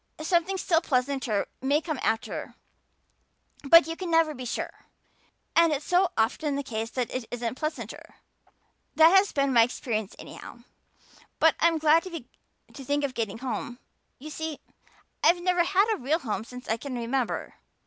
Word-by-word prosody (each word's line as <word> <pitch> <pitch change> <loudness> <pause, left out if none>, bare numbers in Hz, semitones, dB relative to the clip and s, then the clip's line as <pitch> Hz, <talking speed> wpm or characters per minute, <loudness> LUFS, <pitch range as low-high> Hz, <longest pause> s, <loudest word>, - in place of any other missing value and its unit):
Something 345 +3 +1
still 335 -3 +2
pleasanter 255 -7 0 0.2
may 280 +3 +2
come 310 -4 -4
after, 225 0 -2 1.1
but 315 +2 +7
you 325 +1 -4
can 365 0 -5
never 325 -2 +3
be 255 -2 -8
sure. 235 - -5 0.7
And 335 -1 +5
it's 295 0 -2
so 360 0 +3
often 275 +6 0
the 280 - -2
case 225 -3 -4
that 245 -2 -3
it 255 -2 -3
isn't 240 -1 -3
pleasanter. 305 +4 -6 0.8
That 320 +1 +7
has 390 +1 +5
been 275 -1 +1
my 235 - +7
experience 225 -3 -2
anyhow. - - -11 0.7
But 320 0 +5
I'm 335 -1 +3
glad 315 +1 +4
to 330 -4 -12
think 285 +2 -1
of 275 -2 -2
getting 225 -3 -3
home. 245 -1 -4 0.4
You 305 +4 -9
see, 315 -1 -5 0.6
I've 350 - +5
never 360 -1 +3
had 385 +3 +3
a - - -3
real 290 +6 +1
home 225 -7 -4
since 250 +1 -11
I 225 - 0
can 265 +2 -6
remember. 240 +1 -2
285 Hz, 160 wpm, -27 LUFS, 245-330 Hz, 1.1 s, but